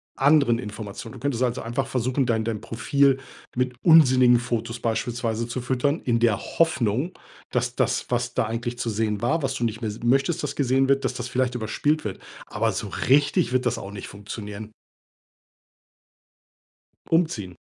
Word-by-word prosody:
anderen 140 -4 +4
Informationen. 110 0 -7
Du - - -10
könntest 140 -4 -2
also 125 0 -1
einfach 130 +4 -2
versuchen, 130 +1 0
dein 110 -2 +1
dein 110 -2 -3
Profil 135 +3 +2 0.4
mit 125 0 0
unsinnigen 130 -7 +7
Fotos 115 -1 -3
beispielsweise 115 0 -2
zu 120 +2 -4
füttern, 130 +5 0
in 115 -2 +2
der 115 -3 +3
Hoffnung, 145 - 0 0.3
dass - - -1
das, - - 0
was - - -1
da - - +2
eigentlich 120 +2 -3
zu 115 - -2
sehen 105 -1 -1
war, 160 +7 +1
was 135 -2 -1
du - - -3
nicht 110 0 -2
mehr 115 - -2
s 105 - -8
möchtest, 135 +8 +2
das 145 -1 -3
gesehen 135 -1 +2
wird, 135 0 +2
dass 130 - -1
das 125 0 -5
vielleicht 125 -1 0
überspielt 135 +7 0
wird, 100 - -4 0.3
aber - - 0
so - - -4 0.2
richtig 135 -3 +3
wird 130 0 +1
das 120 - 0
auch 100 - -7
nicht 105 - -7
funktionieren. 105 +1 -8 2.4
Umziehen. 155 - 0
120 Hz, 170 wpm, -24 LUFS, 115-135 Hz, 2.4 s, unsinnigen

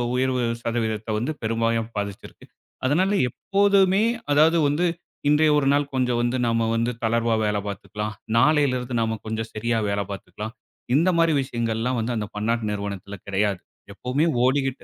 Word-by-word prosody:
உயர்வு 130 -1 +1 0.2
சதவீதத்த 110 -2 -2
வந்து 125 +7 -2
பெரும்பாலும் 115 0 0
பாதிச்சிருக்கு. 100 -1 -6 0.4
அதனால 180 +8 +2 0.2
எப்போதுமே, 200 - +3 0.3
அதாவது 160 +3 +5
வந்து 150 +5 +1 0.4
இன்றைய 150 +1 +4
ஒரு 135 - 0
நாள் 145 0 0
கொஞ்சம் 125 -2 +1
வந்து 120 +1 0
நாம 115 0 +1
வந்து 115 +1 +1
தளர்வா 115 0 +2
வேல 105 0 0
பாத்துக்கலாம். 105 +2 -5 0.2
நாளையிலிருந்து 130 -2 +2
நாம 110 0 -1
கொஞ்சம் 110 +1 -3
சரியா 115 +2 -1
வேல 100 0 0
பாத்துக்கலாம். 100 +3 -7 0.4
இந்த 165 +6 +4
மாரி 165 -1 +4
விஷயங்கள் 115 -4 -2
எல்லாம் 125 +2 0
வந்து 115 +2 -1
அந்தப் 105 -2 -4
பன்னாட்டு 115 +2 0
நிறுவனத்துல 100 -1 -5
கெடையாது. 100 -1 0 0.3
எப்பவுமே 125 +9 0 0.2
ஓடிக்கிட்டு, 135 0 0
115 Hz, 145 wpm, -24 LUFS, 110-140 Hz, 0.4 s, அதாவது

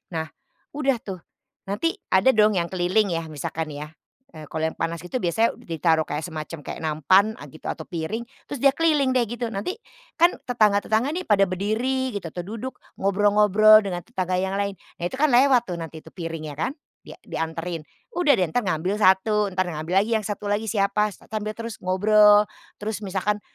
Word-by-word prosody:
Nah 160 0 -2 0.5
udah 270 -4 +1
tuh, 195 -2 -6 0.5
nanti 205 +13 -1 0.2
ada 190 +7 +5
dong 215 0 +5
yang 170 -2 0
keliling 185 +3 +1
ya, 165 -1 -2
misalkan 155 +1 -4
ya, 145 +1 -6 0.5
eee, 155 - -9
kalau 160 0 -2
yang - - -14
panas 165 -1 -2
gitu 180 +8 -4
biasanya 220 +7 +1
ditaruh 165 -7 +1
kayak 150 +2 -3
semacam 160 -1 -6
kayak - - -7
nampan, 155 +6 +4
eee, 145 - -9
gitu, - - -22
atau 160 - -8
piring 175 +7 -3 0.3
terus, 285 - -5
dia 275 - +7
keliling 305 -5 +3
deh, 245 -2 +3
gitu. 235 +1 -4
Nanti, 225 - -4 0.4
kan 345 +2 +5
tetangga-tetangga 220 +3 +2
nih, 365 - -3
pada 200 -2 +4
berdiri 230 +7 -1
gitu, 190 -5 -4
atau 175 +2 -6
duduk 230 +6 -6 0.2
ngobrol-ngobrol 210 +2 +5
dengan 180 -3 -4
tetangga 185 -1 -2
yang 190 +1 -1
lain. 200 -1 -1 0.3
Nah 175 - -1
itu - - -6
kan 305 +2 +3
lewat 250 -1 +5
tuh, - - -2
nanti 160 -1 -7
itu 160 - -14
piringnya 165 -3 -5
kan, 255 - 0 0.3
dia - - -12
dianterin. 165 +1 -4 0.3
Udah 340 -4 +4
deh, 185 - +2
entar 170 +9 -1
ngambil 185 +1 -1
satu, 205 +2 +4
entar 185 0 0
ngambil 165 +1 -2
lagi 230 +2 -2
yang - - -8
satu 205 0 -4
lagi 215 +1 -1
siapa, 210 0 +1 0.2
sambil 215 -1 -2
terus 230 -1 -7
ngobrol. 210 +3 +5 0.3
Terus 210 0 -4
misalkan, 205 +1 -1
200 Hz, 185 wpm, -24 LUFS, 170-220 Hz, 0.5 s, dia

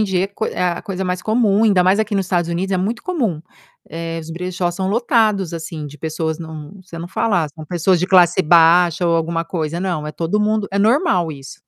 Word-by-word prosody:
em - - +3
dia 190 -2 0
é - - -2
coi 200 +2 -4
é - - -2
a - - -7
coisa 190 -3 -4
mais 180 -1 -2
comum, 220 -1 +2
ainda 195 -4 +4
mais 185 +3 +3
aqui 215 -1 -1
nos 195 -2 0
Estados 175 -2 0
Unidos 185 +3 -2
é - - +2
muito 215 +6 -2
comum, 235 - -2 0.5
eh, 165 +1 -5
os 160 - -11
brechós 175 +1 -3
são 190 0 -2
lotados, 215 -4 +1
assim, 160 -2 -6
de 145 +1 -11
pessoas 160 +1 -3
não 160 -2 -9
você 170 -2 -10
não 170 +1 -6
fala: 195 -4 +1
"Ah, - - -6
são 155 +2 -11
pessoas 175 +3 +1
de 180 - 0
classe 180 -1 +4
baixa 170 +1 +4
ou 170 - +3
alguma 165 0 -2
coisa.", 165 -1 -3
não, 175 -5 -2
é 150 - -5
todo 170 +6 -1
mundo 210 0 0
é 200 - -2
normal 200 - +2
isso. 135 -2 -11
180 Hz, 235 wpm, -19 LUFS, 165-200 Hz, 0.5 s, ainda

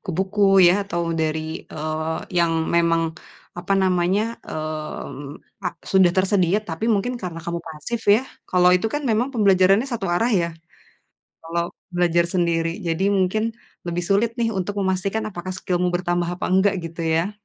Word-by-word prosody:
buku-buku 190 +2 -3 0.3
ya - - +6
atau 170 -3 -2 0.2
dari, 155 0 0 0.3
eee, 155 +1 -3 0.2
yang 170 -1 +3 0.2
memang, 165 -1 +3 0.6
apa 180 +3 -2
namanya, 185 +2 +2 0.2
mmm, 155 -2 -5 0.3
a - - +2 0.2
sudah 190 -2 +6
tersedia, 190 -1 +2
tapi 165 +6 -3
mungkin 225 +5 -1
karena 170 -2 -5
kamu 170 0 -2
pasif 160 +10 -5
ya. 230 - +2 0.3
Kalau 180 0 +4
itu 180 - -1
kan 295 - -1
memang 230 +5 +1
pembelajarannya 195 +2 +4
satu 205 -4 -2
arah 230 +7 +1
ya, 175 -5 +2 0.9
kalau 170 +1 -2 0.3
belajar 175 -1 +3
sendiri. 170 -2 +1 0.2
Jadi 165 +3 0
mungkin 190 +4 +1 0.4
lebih 175 +1 -2
sulit 210 +4 +3
nih 230 -1 +2
untuk 190 +2 -2
memastikan 195 +3 -1
apakah 185 +1 -6
skillmu 180 -1 -1
bertambah 175 -1 0
atau - - -3
enggak 190 +2 +4
gitu 165 0 -8 0.2
ya. 170 +6 0
180 Hz, 150 wpm, -22 LUFS, 170-195 Hz, 0.9 s, ya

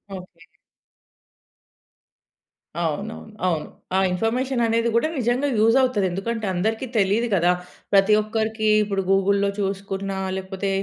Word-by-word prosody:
Okay. 180 -1 -12 2.3
అవునవును. 200 +7 -4
అవును. 165 -4 -1 0.3
ఆ - - +4
ఇన్ఫర్మేషన్ 240 +6 0
అనేది 230 +1 +1
గూడా 270 +7 +3
నిజంగా 250 +3 +1
యూజవుతది. 230 -2 +3
ఎందుకంటే 220 +4 -3
అందరికీ 220 +7 -1
తెలీదు 210 +4 +2
కదా! 175 0 +3 0.4
ప్రతి 195 +1 +5
ఒక్కరికి 220 0 -2 0.2
ఇప్పుడు 195 -1 -1
గూగుల్‌లో 200 +1 +3
చూసుకున్నా 195 0 -3 0.2
లేకపోతే 190 +1 -4
205 Hz, 105 wpm, -23 LUFS, 190-225 Hz, 2.3 s, ప్రతి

